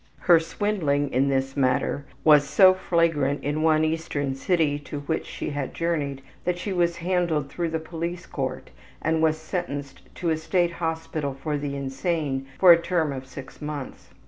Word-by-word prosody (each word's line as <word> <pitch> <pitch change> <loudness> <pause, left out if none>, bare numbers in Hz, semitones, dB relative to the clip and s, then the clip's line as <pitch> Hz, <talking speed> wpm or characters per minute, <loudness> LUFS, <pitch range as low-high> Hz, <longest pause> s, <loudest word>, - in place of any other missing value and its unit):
Her 175 -3 +6
swindling 160 -6 -1
in 135 +3 +3
this 135 0 0
matter 135 +1 +1 0.2
was 150 -2 +7
so 185 +3 +7
flagrant 165 -6 +1
in 145 +2 -1
one 155 -1 +4
eastern 155 -4 -2
city 145 +1 +1
to 145 0 -7
which 160 +3 -2
she - - -5
had 145 -2 -4
journeyed 145 -5 -2 0.2
that 180 0 0
she 195 +2 -3
was 170 -1 +1
handled 170 -5 0
through 170 +1 -2
the 160 - -1
police 170 +2 -5
court - - -4 0.3
and 160 0 0
was 160 -1 +3
sentenced 155 -4 -5
to 170 -2 -1
a 160 - +1
state 175 +2 +1
hospital 160 -4 -3
for 150 +2 -3
the 145 -1 -3
insane 135 0 -2
for 185 -2 +9
a 170 0 +7
term 170 -4 0
of 130 -1 -7
6 135 +2 -10
months. 150 -3 -6
155 Hz, 170 wpm, -25 LUFS, 140-170 Hz, 0.3 s, for